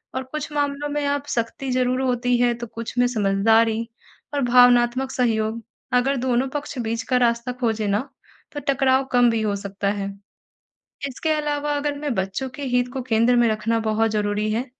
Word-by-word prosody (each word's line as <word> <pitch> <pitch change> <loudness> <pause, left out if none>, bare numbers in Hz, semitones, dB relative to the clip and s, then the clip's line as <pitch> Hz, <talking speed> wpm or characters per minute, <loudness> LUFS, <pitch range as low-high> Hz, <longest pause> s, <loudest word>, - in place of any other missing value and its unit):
और 260 - -2
कुछ 300 +3 -6
मामलों 290 0 -1
में 290 0 -2
आप 285 0 -1
सख्ती 250 +2 -2
ज़रूर 255 0 +1
होती 245 -1 +1
है 240 0 +3
तो 240 0 -7
कुछ 230 +2 -7
में 245 - +5
समझदारी 220 +1 +2 0.6
और 280 - +1
भावनात्मक 245 +1 +4
सहयोग, 225 -2 0 0.3
अगर 260 +3 +3
दोनों 255 +1 +1
पक्ष 290 -1 -5
बीच 230 0 -2
का 250 - +4
रास्ता 235 0 +1
खोजे 220 -3 0
ना 215 +7 -1 0.4
तो 290 - -5
टकराव 265 -1 +3
कम 245 -1 +5
भी 225 -1 0
हो 205 -2 0
सकता 200 0 -3
है। 200 -1 -3 1.0
इसके 275 +4 -4
अलावा 295 -1 -1
अगर 290 0 -2
मैं 295 -3 -2
बच्चों 195 +7 -2
के 285 +2 -8
हित 245 0 +2
को 265 - -3
केंद्र 240 0 +3
में 240 -1 +4
रखना 225 +1 0
बहुत 220 0 +1
ज़रूरी 210 0 0
है, 230 +4 -1
245 Hz, 185 wpm, -23 LUFS, 225-265 Hz, 1.0 s, में